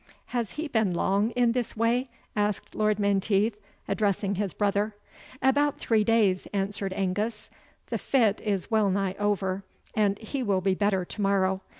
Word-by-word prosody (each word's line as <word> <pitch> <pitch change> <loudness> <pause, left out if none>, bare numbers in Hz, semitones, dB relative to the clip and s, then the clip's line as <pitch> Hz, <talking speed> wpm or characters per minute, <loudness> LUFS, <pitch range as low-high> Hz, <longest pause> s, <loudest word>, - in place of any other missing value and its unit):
"Has 235 -4 -1
he 310 +1 -3
been 220 -9 +1
long 200 +5 +2
in 245 -1 +3
this 240 -2 -2
way?" 240 +3 +1 0.3
asked 210 -1 -1
Lord 215 -1 +1
Menteith, 200 +1 +2 0.3
addressing 200 -1 0
his 200 -1 -1
brother. 205 +2 0 0.5
"About 285 +2 +3
three 220 -2 +2
days," 210 -4 +2
answered 200 0 -1
Angus; 205 +3 -2 0.4
"the - - -1
fit 225 -7 +2
is 205 -1 -2
wellnigh 200 -3 +2
over, 195 -2 0 0.6
he 260 +5 -4
will 200 -6 +1
be 190 0 +2
better 190 -1 +1
to 210 - -6
morrow. 190 -1 +2
205 Hz, 145 wpm, -27 LUFS, 195-225 Hz, 0.6 s, in